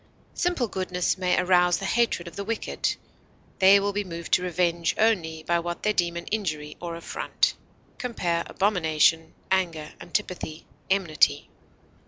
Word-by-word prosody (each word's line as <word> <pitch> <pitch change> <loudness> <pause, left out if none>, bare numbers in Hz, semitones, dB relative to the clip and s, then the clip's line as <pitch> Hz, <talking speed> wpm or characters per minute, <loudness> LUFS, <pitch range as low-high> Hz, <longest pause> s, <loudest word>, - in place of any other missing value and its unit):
Simple 350 -9 0
goodness 185 -3 -1
may 180 -1 +2
arouse 180 -1 +4
the 195 - -5
hatred 225 -5 +1
of 170 - -9
the 200 - -4
wicked; 225 +2 -2 0.6
they 195 +1 +7
will 200 0 -1
be 205 +1 -1
moved 170 -3 -7
to - - +4
revenge 175 -1 0
only 165 -8 +1
by 170 +1 +1
what 175 0 -5
they 210 - +2
deem 170 -3 0
an 170 - -6
injury 155 -8 -2
or 170 -1 -4
affront. 170 - -1 0.5
Compare 175 -9 -1
ABOMINATION; 165 -4 +2 0.2
ANGER; 170 -5 0
ANTIPATHY; 175 -4 -4 0.2
ENMITY. 190 -6 +2
180 Hz, 145 wpm, -26 LUFS, 170-200 Hz, 0.6 s, they